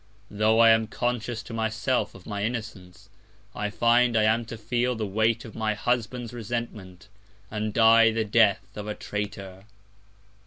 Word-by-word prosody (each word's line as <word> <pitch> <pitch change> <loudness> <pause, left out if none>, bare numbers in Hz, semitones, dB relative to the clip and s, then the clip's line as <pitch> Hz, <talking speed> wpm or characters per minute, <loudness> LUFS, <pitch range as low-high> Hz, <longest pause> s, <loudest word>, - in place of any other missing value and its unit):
Tho' 110 +2 +2
I 115 0 +7
am 110 0 +3
conscious 120 -1 -3
to 110 - -10
myself 110 +3 -1
of 95 - -14
my 100 -1 -4
Innocence, 105 -5 -6 0.5
I 105 - -3
find 120 +2 +3
I 110 - +3
am 110 +2 +2
to 115 0 -8
feel 120 +3 -1
the 110 -1 -3
Weight 110 +3 0
of 110 - -10
my 110 -1 -1
Husband's 120 +1 -2
Resentment, 110 -6 -6 0.4
and 105 0 -3
die 115 +1 +6
the 110 0 -1
Death 105 -2 +3
of 105 0 -6
a 105 - -4
Traitor. 100 -2 -6
110 Hz, 160 wpm, -26 LUFS, 105-115 Hz, 0.5 s, I